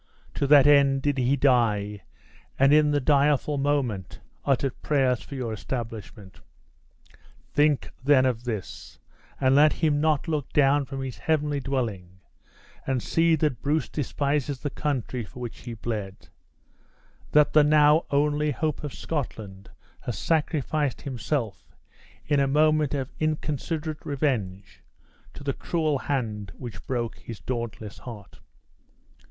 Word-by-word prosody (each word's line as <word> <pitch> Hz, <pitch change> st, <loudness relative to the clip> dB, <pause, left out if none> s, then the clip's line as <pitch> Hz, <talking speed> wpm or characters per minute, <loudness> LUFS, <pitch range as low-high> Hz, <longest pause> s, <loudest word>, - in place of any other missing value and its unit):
To 140 Hz, -, -1 dB
that 145 Hz, -1 st, +7 dB
end 140 Hz, -2 st, +5 dB
did 145 Hz, -2 st, 0 dB
he 130 Hz, +2 st, +2 dB
die, 110 Hz, -7 st, +2 dB, 0.6 s
and 135 Hz, +2 st, +5 dB
in 150 Hz, 0 st, +5 dB
the 145 Hz, 0 st, +2 dB
direful 145 Hz, +1 st, +2 dB
moment, 130 Hz, -10 st, -1 dB, 0.2 s
uttered 135 Hz, -1 st, 0 dB
prayers 130 Hz, -6 st, +1 dB
for 140 Hz, -, -9 dB
your 120 Hz, -4 st, -3 dB
establishment. 110 Hz, -5 st, -7 dB, 1.1 s
Think 145 Hz, -1 st, +2 dB
then 135 Hz, -1 st, +5 dB
of 120 Hz, -2 st, 0 dB
this, 110 Hz, -6 st, -6 dB, 0.4 s
and 130 Hz, -1 st, +3 dB
let 150 Hz, +2 st, +6 dB
him 150 Hz, -3 st, +1 dB
not 155 Hz, -1 st, +1 dB
look 150 Hz, -4 st, -2 dB
down 140 Hz, 0 st, +4 dB
from 135 Hz, 0 st, -5 dB
his 125 Hz, -8 st, -6 dB
heavenly 150 Hz, -, 0 dB
dwelling 110 Hz, -10 st, -3 dB, 0.7 s
and 130 Hz, -3 st, 0 dB
see 165 Hz, 0 st, +3 dB
that 150 Hz, -6 st, -1 dB
Bruce 150 Hz, +3 st, 0 dB
despises 140 Hz, -1 st, -2 dB
the 145 Hz, -, -3 dB
country 130 Hz, -4 st, -2 dB
for 110 Hz, -, -12 dB
which 120 Hz, -2 st, -6 dB
he 120 Hz, -2 st, -7 dB
bled; 105 Hz, -4 st, -5 dB, 1.0 s
that 150 Hz, 0 st, +4 dB
the 150 Hz, -, +7 dB
now 150 Hz, +1 st, +5 dB
only 150 Hz, +1 st, +1 dB
hope 155 Hz, +1 st, -2 dB
of 145 Hz, -, -5 dB
Scotland 105 Hz, -10 st, -5 dB, 0.3 s
has 120 Hz, -, -5 dB
sacrificed 150 Hz, -3 st, 0 dB
himself 130 Hz, -4 st, -4 dB, 0.5 s
in 145 Hz, -1 st, +2 dB
a 140 Hz, -, +3 dB
moment 155 Hz, 0 st, +3 dB
of 135 Hz, -2 st, -3 dB
inconsiderate 155 Hz, 0 st, -2 dB
revenge 105 Hz, -10 st, -2 dB, 0.5 s
to -, -, -9 dB
the 140 Hz, -1 st, -1 dB
cruel 155 Hz, -3 st, -1 dB
hand 110 Hz, -, -3 dB
which 120 Hz, -3 st, -9 dB
broke 120 Hz, -3 st, -3 dB
his 115 Hz, -3 st, -9 dB
dauntless 115 Hz, -4 st, -5 dB
heart!" 110 Hz, -5 st, -11 dB
140 Hz, 135 wpm, -26 LUFS, 120-150 Hz, 1.1 s, that